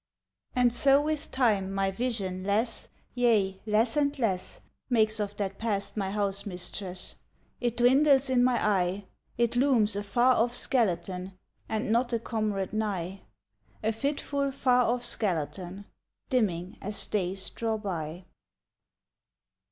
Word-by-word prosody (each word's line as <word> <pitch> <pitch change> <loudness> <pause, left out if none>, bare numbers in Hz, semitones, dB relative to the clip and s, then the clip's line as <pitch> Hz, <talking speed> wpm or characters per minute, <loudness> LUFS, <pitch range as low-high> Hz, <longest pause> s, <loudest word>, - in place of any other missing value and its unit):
And 245 -2 +3
so 275 +3 +5
with 305 +1 -2
time 210 -7 +1
my 195 0 0
vision 195 -4 -2
less, 215 +4 0 0.3
Yea, 210 -6 +2
less 220 +4 +2
and 290 0 +1
less 195 -8 -2 0.3
Makes 220 -3 +2
of 205 -1 -3
that 195 -1 -3
Past 205 -3 -2
my 195 -3 -1
housemistress, 195 -2 -3 0.5
It 240 -1 -1
dwindles 270 +3 +5
in 255 -2 +3
my 250 -1 +3
eye; 190 -1 0 0.3
It 235 0 +1
looms 245 -5 +3
a 205 - -1
far 240 +5 +3
off 240 +2 +2
skeleton 185 -6 0 0.3
And 220 +1 -1
not 240 +1 +2
a 230 - +1
comrade 215 -4 -2
nigh, 195 -3 -2 0.6
A 220 - +2
fitful 280 +3 -1
far 250 -2 +3
off 245 0 -1
skeleton 185 -1 -2 0.5
Dimming 190 -7 0
as 205 +1 +1
days 190 -1 -2
draw 225 -1 -2
by. 175 -4 -5
215 Hz, 130 wpm, -28 LUFS, 195-245 Hz, 0.6 s, so